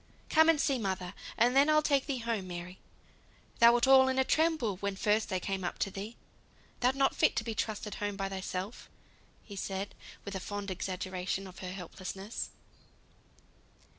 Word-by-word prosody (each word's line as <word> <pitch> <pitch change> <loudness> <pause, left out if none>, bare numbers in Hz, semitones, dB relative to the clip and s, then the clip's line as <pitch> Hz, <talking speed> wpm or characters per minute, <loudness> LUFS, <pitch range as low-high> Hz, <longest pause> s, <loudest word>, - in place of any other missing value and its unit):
"Come 320 0 +6
and 325 -2 +4
see 270 -3 +2
mother, 190 -3 -2 0.2
and 245 +2 +4
then 280 +2 +6
I'll 305 0 +5
take 280 -2 +2
thee 275 -3 -1
home, 230 -5 -2
Mary. 175 +1 -7 0.8
Thou 235 0 +9
wert 240 +1 +3
all 265 0 +7
in 260 0 0
a 265 - +5
tremble 310 - +1
when 200 0 -2
first 210 +2 +1
I 185 - +1
came 195 +1 -3
up 175 - -2
with 195 - -9
thee; 210 +4 -6 0.6
thou'rt 250 +2 +3
not 275 0 +2
fit - - +3
to 230 - 0
be 225 0 -3
trusted 215 -1 -3
home 205 0 -3
by 195 -1 -1
thyself," 190 +2 -5 0.7
said 195 +1 -4
he, - - -14
with 200 -2 -4
fond 205 0 -4
exaggeration 185 +1 -3
of 185 -1 -11
her 185 -1 -5
helplessness. 190 +3 -6
205 Hz, 175 wpm, -31 LUFS, 190-250 Hz, 0.8 s, Thou